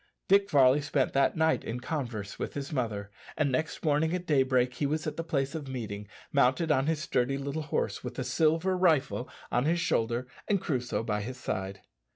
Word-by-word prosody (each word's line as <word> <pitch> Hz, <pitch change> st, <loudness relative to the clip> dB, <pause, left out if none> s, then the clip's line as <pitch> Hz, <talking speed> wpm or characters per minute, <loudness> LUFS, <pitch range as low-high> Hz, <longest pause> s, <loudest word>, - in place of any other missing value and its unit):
Dick 200 Hz, +1 st, +4 dB
Varley 135 Hz, 0 st, +5 dB
spent 140 Hz, -2 st, 0 dB
that 140 Hz, +3 st, +2 dB
night 160 Hz, 0 st, +2 dB
in 120 Hz, +2 st, -4 dB
converse 120 Hz, -8 st, -4 dB
with -, -, -4 dB
his 140 Hz, +1 st, -4 dB
mother, 105 Hz, -6 st, -2 dB, 0.3 s
and 145 Hz, -3 st, +2 dB
next 155 Hz, +5 st, -2 dB
morning 155 Hz, +3 st, +2 dB
at 180 Hz, 0 st, -4 dB
daybreak 130 Hz, -4 st, +2 dB
he 145 Hz, -, -1 dB
was 155 Hz, +2 st, -1 dB
at 155 Hz, -, -3 dB
the 165 Hz, -, -3 dB
place 140 Hz, -3 st, -1 dB
of 155 Hz, -4 st, -5 dB
meeting, 105 Hz, -6 st, -5 dB, 0.2 s
mounted 140 Hz, +4 st, +3 dB
on 135 Hz, -1 st, +2 dB
his 160 Hz, -1 st, +1 dB
sturdy 130 Hz, +2 st, 0 dB
little 140 Hz, +3 st, -3 dB
horse, 155 Hz, -, -2 dB
with 125 Hz, -1 st, -5 dB
the 130 Hz, -, -2 dB
"silver 160 Hz, +8 st, +2 dB
rifle" 155 Hz, -8 st, +2 dB, 0.2 s
on 120 Hz, +2 st, +2 dB
his 170 Hz, +3 st, +2 dB
shoulder 120 Hz, -5 st, 0 dB, 0.2 s
and 200 Hz, -2 st, +2 dB
Crusoe 125 Hz, -10 st, -2 dB
by 105 Hz, -2 st, -1 dB
his 125 Hz, +5 st, -6 dB
side. 95 Hz, -5 st, -4 dB
140 Hz, 195 wpm, -29 LUFS, 125-155 Hz, 0.3 s, Varley